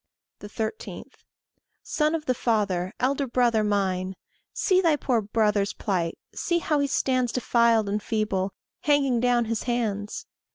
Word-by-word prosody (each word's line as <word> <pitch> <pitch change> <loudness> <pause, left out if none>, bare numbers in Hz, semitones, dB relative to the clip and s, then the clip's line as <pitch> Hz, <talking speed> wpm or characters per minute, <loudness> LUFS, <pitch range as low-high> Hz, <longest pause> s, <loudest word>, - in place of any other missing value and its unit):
13. 220 - -5 0.8
Son 305 +1 +1
of 310 -2 -4
the 255 - +2
Father, 200 -7 0
elder 275 +2 +1
brother 235 -3 +2
mine, 190 -2 0 0.4
See 370 -1 +2
thy 330 -4 +3
poor 250 -5 0
brother's 210 -1 +1
plight; 175 -5 -2 0.2
See 345 - 0
how 310 -3 0
he 285 - +1
stands 255 -3 +1
Defiled 235 -3 +3
and 205 +1 -1
feeble, 205 -3 -1 0.3
hanging 285 -7 +2
down 240 -1 +2
his 225 0 -2
hands! 225 - -2
230 Hz, 135 wpm, -26 LUFS, 205-265 Hz, 0.8 s, thy